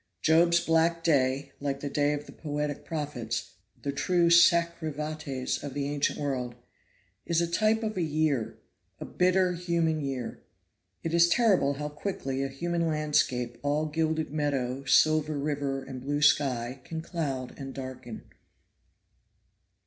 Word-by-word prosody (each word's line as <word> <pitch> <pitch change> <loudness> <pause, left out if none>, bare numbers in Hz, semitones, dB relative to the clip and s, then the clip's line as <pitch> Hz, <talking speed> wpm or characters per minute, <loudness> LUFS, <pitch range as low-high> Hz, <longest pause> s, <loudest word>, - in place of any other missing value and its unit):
Job's 170 +2 +5
black 165 0 +2
day, 135 -3 +2
like 140 -1 -2
the 145 - -4
day 145 +1 +1
of 145 0 -4
the - - -12
poetic 150 -1 -4
prophets 120 - -4 0.3
the 140 - -1
true 170 +4 +2
sacri 170 -1 +4
vates 150 -3 -3
of 140 -2 -6
the 140 -1 -1
ancient 145 0 0
world 130 -4 -3 0.7
is 170 -1 +2
a 170 - +2
type 215 +6 +1
of 215 -1 -2
a 185 - -1
year 155 -6 0 0.4
a - - -6
bitter 185 0 +2
human 170 -2 0
year. 130 -4 -4 0.6
It 165 - -2
is 170 0 +5
terrible 195 -11 +3
how 150 +1 -4
quickly 140 -5 -3
a - - 0
human 170 +5 -1
landscape 150 -6 0
all 145 +2 0
gilded 160 0 -1
meadow, 140 -3 -1
silver 155 +1 +3
river 140 -2 -2
and 130 -1 -8
blue 145 +2 -1
sky 130 -3 +2
can 160 +3 -5
cloud 140 -8 -3
and 135 -1 -6
darken. 130 -4 -8
150 Hz, 145 wpm, -28 LUFS, 135-165 Hz, 0.7 s, Job's